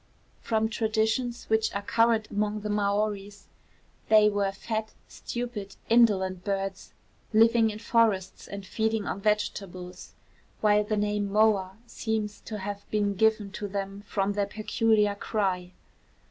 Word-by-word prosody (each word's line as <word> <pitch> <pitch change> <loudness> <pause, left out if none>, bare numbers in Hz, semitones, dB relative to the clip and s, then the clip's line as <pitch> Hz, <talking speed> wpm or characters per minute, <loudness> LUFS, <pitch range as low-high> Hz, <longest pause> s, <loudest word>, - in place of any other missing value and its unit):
From 220 -1 0
traditions 220 +2 -1
which 220 0 +2
are 200 - -2
current 225 0 +2
among 210 +1 -1
the 210 0 -3
Maoris, 205 0 -1 0.6
they 215 -1 +7
were 200 -1 0
fat, 220 +2 -4
stupid, 235 -5 -6
indolent 190 -6 +3
birds, 195 -1 -3 0.4
living 225 +1 +5
in 210 - -5
forests 215 -4 +1
and 200 -1 -7
feeding 220 +1 -1
on 195 - -4
vegetables; 185 -3 -3 0.4
while 210 0 +4
the 215 0 -1
name 205 -1 0
moa 200 -2 +2
seems 220 -3 -3
to 215 - -5
have 200 0 -6
been 205 -1 +1
given 215 0 +2
to 205 - -5
them 195 0 -4
from 200 0 0
their 200 -1 0
peculiar 215 0 +1
cry. 190 -4 -2
210 Hz, 135 wpm, -27 LUFS, 200-220 Hz, 0.6 s, they